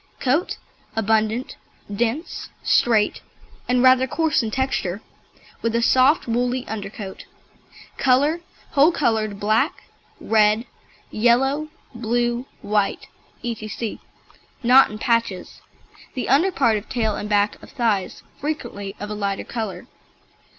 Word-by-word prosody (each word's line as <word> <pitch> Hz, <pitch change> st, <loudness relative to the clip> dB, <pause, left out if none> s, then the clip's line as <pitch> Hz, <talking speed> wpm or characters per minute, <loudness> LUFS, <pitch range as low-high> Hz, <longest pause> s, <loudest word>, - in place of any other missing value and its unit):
COAT 280 Hz, +7 st, 0 dB, 0.4 s
Abundant, 220 Hz, +2 st, 0 dB, 0.4 s
dense, 240 Hz, -, -2 dB
straight, 220 Hz, -3 st, +3 dB, 0.5 s
and 250 Hz, 0 st, +3 dB
rather 260 Hz, 0 st, +6 dB
coarse 320 Hz, +1 st, +1 dB
in 225 Hz, -, -2 dB
texture, 215 Hz, -6 st, -1 dB, 0.6 s
with 230 Hz, 0 st, 0 dB
a 235 Hz, -, +2 dB
soft 260 Hz, +6 st, +4 dB
woolly 245 Hz, +2 st, 0 dB
undercoat. 200 Hz, -2 st, -6 dB, 0.7 s
COLOUR 280 Hz, +6 st, +3 dB, 0.3 s
Whole 290 Hz, +3 st, +5 dB
coloured 220 Hz, -, 0 dB
black, 220 Hz, -, +1 dB, 0.4 s
red, 215 Hz, +1 st, +3 dB, 0.5 s
yellow, 270 Hz, +7 st, +2 dB, 0.3 s
blue, 240 Hz, +2 st, -1 dB, 0.2 s
white, 205 Hz, -1 st, 0 dB, 0.3 s
etc., 225 Hz, -1 st, -4 dB, 0.6 s
not 255 Hz, +3 st, +7 dB
in 215 Hz, -, -7 dB
patches 230 Hz, -4 st, -1 dB, 0.5 s
(the 255 Hz, -, -3 dB
under 310 Hz, +9 st, +4 dB
part 235 Hz, -10 st, +2 dB
of 205 Hz, -, -8 dB
tail 220 Hz, -4 st, 0 dB
and 210 Hz, -, -5 dB
back 205 Hz, 0 st, +1 dB
of -, -, -13 dB
thighs 225 Hz, -7 st, -1 dB, 0.2 s
frequently 205 Hz, -9 st, -4 dB
of 205 Hz, +1 st, -5 dB
a -, -, -2 dB
lighter 200 Hz, -2 st, -2 dB
colour). 220 Hz, -5 st, -5 dB
235 Hz, 115 wpm, -22 LUFS, 215-260 Hz, 0.7 s, not